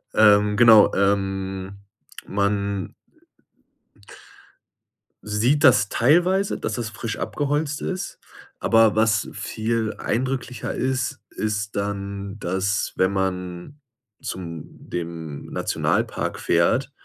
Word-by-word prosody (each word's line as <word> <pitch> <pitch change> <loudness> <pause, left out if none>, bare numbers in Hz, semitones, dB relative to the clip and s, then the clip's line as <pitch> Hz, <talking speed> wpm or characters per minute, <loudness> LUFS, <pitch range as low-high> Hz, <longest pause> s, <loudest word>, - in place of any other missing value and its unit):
ähm, 105 -1 +5
genau 110 -3 +7
ähm, 95 -1 -1 0.5
man 100 -1 -1 2.3
sieht 115 +8 +1
das 115 -7 +5
teilweise, 175 +9 +2
dass 110 - -3
das 115 -1 -3
frisch 115 0 -5
abgeholzt 145 +1 -2
ist. 185 -1 -4 0.4
Aber 115 -1 +4
was 110 -1 +2
viel 110 0 -2
eindrücklicher 125 +1 -2
ist, 130 0 -1
ist 105 -1 -3
dann, 100 0 -4
dass 95 +2 -1
wenn 95 +1 +3
man 90 +6 -3 0.4
zu - - -5 0.3
dem 85 -4 -7
Nationalpark - - -1
fährt, - - +2
105 Hz, 90 wpm, -23 LUFS, 100-120 Hz, 2.3 s, genau